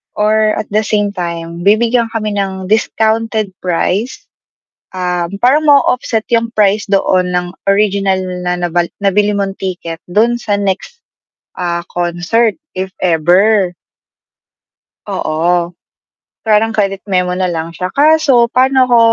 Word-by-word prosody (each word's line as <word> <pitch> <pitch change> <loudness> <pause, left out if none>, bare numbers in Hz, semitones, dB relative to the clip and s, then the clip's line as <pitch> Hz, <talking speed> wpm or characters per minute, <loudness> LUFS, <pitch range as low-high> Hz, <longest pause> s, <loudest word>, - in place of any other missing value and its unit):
or 215 0 +2
at 215 - -4
the 215 - +2
same 205 -1 0
time 170 -1 -5
bibigyan 230 +2 +3
kami 215 -1 -1
ng 190 -1 -3
discounted 220 -1 0
price, 185 +6 -1 0.8
um, 180 0 -2
parang 300 +5 +3
na-o-offset 250 -5 +3
'yung 230 0 +2
price 210 0 +2
doon 185 -2 +2
ng 180 0 -2 0.2
original 195 -1 +2 0.3
na 180 - +1
nabal 175 -1 -1 0.2
nabili 205 +1 +2
mong 195 -1 -3
ticket 175 -3 -5
dun 230 +6 +1
sa 210 -3 -1
next, 200 - -3 0.5
ah, 170 -1 -2
concert, 175 +6 0 0.2
if 190 +1 -4
ever. 180 +3 +3 1.3
Oo, 170 +2 0 0.7
parang 220 0 +2
credit 195 -2 0
memo 180 -2 0
na 185 - +1
lang 165 -1 -3
siya. 180 +2 -5
Kaso 285 -5 +4
paano 260 0 +3
ako 240 - +5
200 Hz, 125 wpm, -14 LUFS, 180-220 Hz, 1.3 s, ako